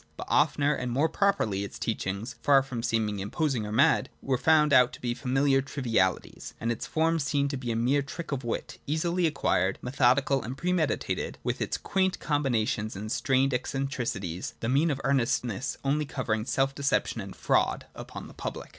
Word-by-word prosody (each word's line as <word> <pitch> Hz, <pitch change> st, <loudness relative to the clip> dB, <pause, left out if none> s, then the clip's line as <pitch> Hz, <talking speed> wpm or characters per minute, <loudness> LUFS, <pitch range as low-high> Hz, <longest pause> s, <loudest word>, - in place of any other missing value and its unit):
But -, -, -6 dB
oftener 145 Hz, 0 st, +3 dB
and 125 Hz, -4 st, -3 dB
more 140 Hz, +6 st, +2 dB
properly 160 Hz, -, +1 dB
its 100 Hz, -, -7 dB
teachings 110 Hz, +2 st, -3 dB
— -, -, -37 dB
far 140 Hz, -2 st, +5 dB
from 125 Hz, -3 st, -5 dB
seeming 110 Hz, -3 st, 0 dB
im 100 Hz, +1 st, -4 dB
posing 135 Hz, -9 st, -1 dB
or -, -, -5 dB
mad 120 Hz, +6 st, +3 dB
— -, -, -37 dB
were 135 Hz, -, +1 dB
found 150 Hz, +2 st, +4 dB
out 125 Hz, -2 st, +6 dB
to -, -, -9 dB
be 120 Hz, -1 st, -1 dB
familiar 135 Hz, +2 st, +2 dB
trivialities, 115 Hz, -, -1 dB
and 115 Hz, -, -1 dB
its 115 Hz, -, -4 dB
form 165 Hz, +1 st, +1 dB
seen 140 Hz, -1 st, +1 dB
to 140 Hz, -, -3 dB
be 125 Hz, -3 st, -3 dB
a -, -, -1 dB
mere 125 Hz, +5 st, +2 dB
trick 155 Hz, +4 st, -7 dB
of 135 Hz, -2 st, -2 dB
wit, 120 Hz, -, -4 dB
easily 170 Hz, +4 st, +1 dB
acquired, 120 Hz, -10 st, +1 dB
methodical 135 Hz, +1 st, +2 dB
and 125 Hz, +4 st, -6 dB
premeditated, 175 Hz, -2 st, -1 dB
with -, -, -2 dB
its -, -, -1 dB
quaint 190 Hz, -1 st, 0 dB
combinations 115 Hz, -7 st, 0 dB
and 105 Hz, +3 st, -5 dB
strained 135 Hz, +1 st, +2 dB
eccentricities, 120 Hz, -10 st, -3 dB
— -, -, -38 dB
the 115 Hz, -, -3 dB
mien 145 Hz, +6 st, +3 dB
of 140 Hz, -3 st, -1 dB
earnestness 125 Hz, -2 st, 0 dB
only 145 Hz, +2 st, +1 dB
covering 115 Hz, -6 st, -2 dB
self 135 Hz, +1 st, +1 dB
deception 140 Hz, 0 st, 0 dB
and -, -, -8 dB
fraud -, -, +1 dB
upon -, -, -8 dB
the -, -, -13 dB
public. -, -, -6 dB
135 Hz, 190 wpm, -28 LUFS, 115-145 Hz, -, out